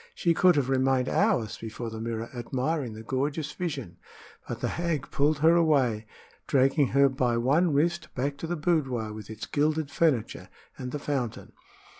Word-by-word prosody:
She 170 Hz, -2 st, +2 dB
could 180 Hz, 0 st, +5 dB
have 140 Hz, -3 st, +1 dB
remained 130 Hz, -1 st, +2 dB
hours 195 Hz, -, +1 dB
before 115 Hz, +1 st, -6 dB
the 110 Hz, 0 st, -6 dB
mirror 115 Hz, 0 st, -3 dB
admiring 130 Hz, +2 st, -2 dB
the 110 Hz, +1 st, -9 dB
gorgeous 140 Hz, +6 st, -2 dB
vision; 135 Hz, -, -5 dB, 0.5 s
but -, -, -5 dB
the -, -, -1 dB
hag 170 Hz, -4 st, -2 dB
pulled 145 Hz, +2 st, +2 dB
her 165 Hz, +1 st, +7 dB
away, 135 Hz, -10 st, +2 dB, 0.4 s
dragging 135 Hz, +1 st, +3 dB
her 140 Hz, +2 st, +4 dB
by 125 Hz, -3 st, 0 dB
one 150 Hz, +9 st, +3 dB
wrist 165 Hz, +4 st, +1 dB
back 140 Hz, +3 st, -1 dB
to 165 Hz, -, -5 dB
the 175 Hz, -, -1 dB
boudoir, 135 Hz, -10 st, 0 dB
with 105 Hz, -1 st, -9 dB
its 110 Hz, 0 st, -6 dB
gilded 150 Hz, 0 st, 0 dB
furniture 145 Hz, -10 st, 0 dB, 0.3 s
and 125 Hz, -1 st, -6 dB
the 150 Hz, -, -3 dB
fountain. 135 Hz, -6 st, -3 dB
135 Hz, 170 wpm, -27 LUFS, 120-155 Hz, 0.5 s, her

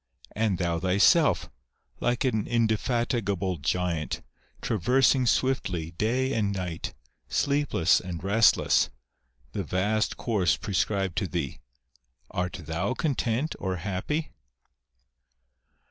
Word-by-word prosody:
And 110 Hz, -4 st, +1 dB
thou 85 Hz, -2 st, 0 dB
thyself, 95 Hz, +2 st, +4 dB, 0.5 s
like 120 Hz, +2 st, 0 dB
an 110 Hz, -5 st, 0 dB
indefatigable 110 Hz, -4 st, 0 dB
giant, 85 Hz, +1 st, -1 dB, 0.4 s
traversing 125 Hz, +5 st, +2 dB
swiftly, 95 Hz, -12 st, 0 dB
day 125 Hz, +9 st, 0 dB
and 105 Hz, -3 st, +1 dB
night, 90 Hz, -8 st, -4 dB, 0.3 s
sleepless 140 Hz, -, +2 dB
and 90 Hz, -2 st, -6 dB
restless, 105 Hz, +4 st, +4 dB, 0.6 s
the -, -, -3 dB
vast 105 Hz, +4 st, 0 dB
course 100 Hz, -8 st, +1 dB
prescribed 95 Hz, -2 st, -1 dB
to 100 Hz, -, -2 dB
thee; 85 Hz, -7 st, -3 dB, 0.7 s
art 90 Hz, 0 st, -3 dB
thou 85 Hz, +10 st, -2 dB
content 135 Hz, -2 st, -1 dB
or 95 Hz, -1 st, -2 dB
happy 100 Hz, -, -3 dB
100 Hz, 100 wpm, -27 LUFS, 90-120 Hz, 0.7 s, thyself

